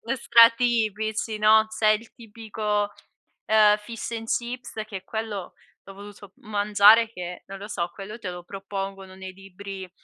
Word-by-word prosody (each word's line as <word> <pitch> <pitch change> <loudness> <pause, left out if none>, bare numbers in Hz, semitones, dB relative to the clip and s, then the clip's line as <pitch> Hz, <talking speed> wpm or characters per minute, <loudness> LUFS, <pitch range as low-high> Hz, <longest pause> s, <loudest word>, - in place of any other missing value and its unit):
stra 230 -2 +7
tipici, 220 -2 -1
no, 220 +1 +5
c'è 220 0 +1
il 215 +2 0
tipico, 215 -2 -3 0.5
ehm 210 -1 +5
fish 230 +2 -7
and 225 -1 -5
chips 240 +1 -3
che 210 -2 -7
è 185 - -12
quello 215 -3 -5 0.3
l'ho 195 - -12
voluto 205 0 -12
m - - -18
mangiare 210 +2 +5
che, 180 -3 -7
non 195 - -8
lo 200 +2 -9
so, 175 -5 -3
quello 210 +2 -8
te 195 - -5
lo 180 0 -8
propongono 195 0 -7
nei 190 0 -9
libri 195 0 -9
210 Hz, 160 wpm, -25 LUFS, 195-220 Hz, 0.5 s, stra